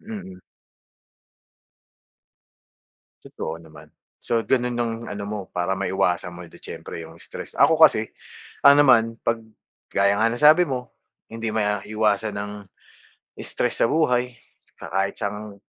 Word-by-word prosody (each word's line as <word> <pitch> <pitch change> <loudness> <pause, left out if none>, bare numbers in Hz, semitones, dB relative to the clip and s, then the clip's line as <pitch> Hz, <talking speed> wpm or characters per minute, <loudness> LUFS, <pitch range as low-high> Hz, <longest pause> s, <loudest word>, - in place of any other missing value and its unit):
Mm 215 -2 -7
mm. 190 -1 -12 2.8
Totoo 135 - -6
naman. 80 -1 -15 0.3
So 115 -1 -1
dun 125 0 +1
nun 120 - -3
nung 115 -1 -1
ano 105 0 -6
mo, 105 +1 -4 0.2
para 90 +2 0
maiwasan 90 -2 0
mo 90 - -9
di - - -16
siyempre - - -8
yung 80 +1 -12
stress. - - -8
Ako 155 +3 +4
kasi, 110 -9 +6 0.6
ano 140 +1 +8
naman 115 -4 +4
'pag 115 0 0 0.5
gaya 100 +1 +2
nga 110 - +3
ng 120 - -4
sabi 155 +4 +8
mo, 125 -2 -4 0.4
hindi 115 0 -4
maiiwasan 105 0 0
ang 105 0 -5 0.9
stress - - -2
sa - - +3
buhay, 125 -5 +1 0.5
sa - - -8
kahit 95 +1 0
saan 105 0 -5
110 Hz, 140 wpm, -23 LUFS, 100-125 Hz, 2.8 s, ano